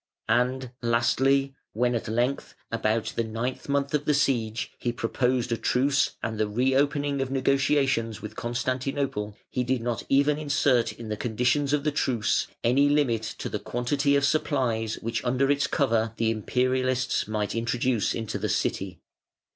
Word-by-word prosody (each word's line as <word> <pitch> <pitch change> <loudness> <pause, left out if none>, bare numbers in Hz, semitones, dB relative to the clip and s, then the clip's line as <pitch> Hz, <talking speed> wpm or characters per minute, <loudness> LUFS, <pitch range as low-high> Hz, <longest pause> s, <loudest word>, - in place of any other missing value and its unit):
And, 125 +2 +1
lastly, 135 +4 +2 0.2
when 120 +3 +1
at 115 - -2
length, 120 +5 -1 0.2
about 115 0 0
the 115 - +1
ninth 115 +5 -4
month 140 0 0
of 150 -1 0
the 150 - +3
siege, 120 -6 0
he 120 - -1
proposed 125 +1 0
a 115 - +1
truce 135 +4 +1
and 110 -1 -3
the 110 - +2
reopening 140 +5 +1
of 135 - -2
negotiations 135 -4 +1
with 105 +1 -8
Constantinople, 130 -2 -2
he 125 - 0
did 130 +1 0
not 120 -1 -2
even 145 +2 +3
insert 145 -5 +2
in 115 -2 -9
the 105 - -2
conditions 125 +6 +1
of 145 -1 +1
the 150 - +1
truce 130 -6 0 0.2
any 135 +4 +4
limit 140 -6 +2 0.2
to - - -4
the - - -3
quantity 140 +4 0
of 140 0 +3
supplies 125 -8 0
which 115 0 -2
under 130 +3 +2
its 145 0 +1
cover 115 -5 +1
the 115 0 +1
Imperialists 130 +3 0
might 105 -1 -2
introduce 115 0 0
into 115 -2 -3
the - - -2
City. 95 -1 -1
125 Hz, 160 wpm, -26 LUFS, 115-140 Hz, 0.2 s, any